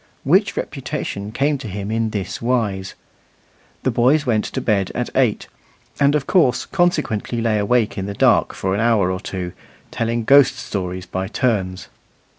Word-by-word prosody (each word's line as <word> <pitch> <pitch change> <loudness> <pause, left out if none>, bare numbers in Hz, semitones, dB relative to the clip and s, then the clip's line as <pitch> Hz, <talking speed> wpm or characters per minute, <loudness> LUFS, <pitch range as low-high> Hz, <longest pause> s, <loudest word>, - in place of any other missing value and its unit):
Which - - +2
reputation 100 +1 -4
came 140 +4 0
to 125 - -7
him 100 +1 -5
in 115 0 0
this 100 -4 -4
wise. 110 -6 -1 0.9
The - - +1
boys 140 +5 +3
went 110 -4 +1
to - - -4
bed 100 -4 0
at - - -2
eight, - - +1 0.5
and, 140 +1 +4
of 145 -3 0
course, 150 -9 +2
consequently 150 - 0
lay 115 -2 +1
awake 110 +1 +1
in 95 - -3
the 100 - -5
dark - - +3
for 95 0 -1
an 100 - 0
hour 110 -5 +2
or 95 - -3
two, 90 -3 -5 0.4
telling 115 0 -1
ghost 135 +2 +6
stories 90 -2 -4
by 95 0 -3
turns. 100 -5 -1
110 Hz, 165 wpm, -20 LUFS, 95-125 Hz, 0.9 s, ghost